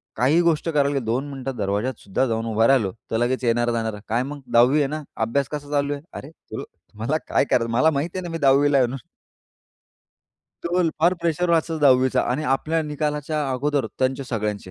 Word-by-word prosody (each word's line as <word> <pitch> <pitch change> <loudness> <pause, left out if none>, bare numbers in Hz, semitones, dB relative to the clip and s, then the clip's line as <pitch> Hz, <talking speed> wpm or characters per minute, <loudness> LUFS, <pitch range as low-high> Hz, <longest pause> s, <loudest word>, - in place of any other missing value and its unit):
काही 135 +9 +3
गोष्ट 170 -1 +1
करायला 145 -2 +1
दोन 125 +4 -2
मिनिटं 135 -1 -5
दरवाज्यातसुद्धा 105 +2 -1
जाऊन 115 0 -2
उभा 115 0 +2
राहिलो, 120 -9 +3 0.2
तर 110 - +1
लगेच 125 +3 0
येणारे-जाणारे, 115 -2 0
"काय 115 +3 0
मग 145 +1 -7
10वी 125 +5 +5
आहे 145 - +2
ना, 155 +2 -5 0.2
अभ्यास 135 +4 0
कसा 145 -1 -5
चालू 145 0 +1
आहे?" 140 - -6
अरे, 140 - -8
तुला 160 - -9
तुम्हाला 115 +9 -4
काय - - +2
करायचं, 115 -1 +1
मला 130 +7 +4
माहीत 145 +4 -1
आहे 185 - -2
ना, 175 - -5
मी 165 - -3
10वी 140 -1 +4
ला 140 - +4
आहे 130 - +4
म्हणून. 130 +1 -6 1.6
केवल 175 -1 +1
फार 175 +3 +4
प्रेशर 170 +1 0
असतं 165 0 +1
10वी 130 -2 +5
चा - - +2
आणि 150 +5 -1
आपल्या 160 +4 -1
निकालाच्या 150 0 -2
अगोदर 140 -1 0
त्यांचे 130 +1 0
सगळ्यांचे. 105 -5 -3
135 Hz, 190 wpm, -23 LUFS, 120-150 Hz, 1.6 s, 10वी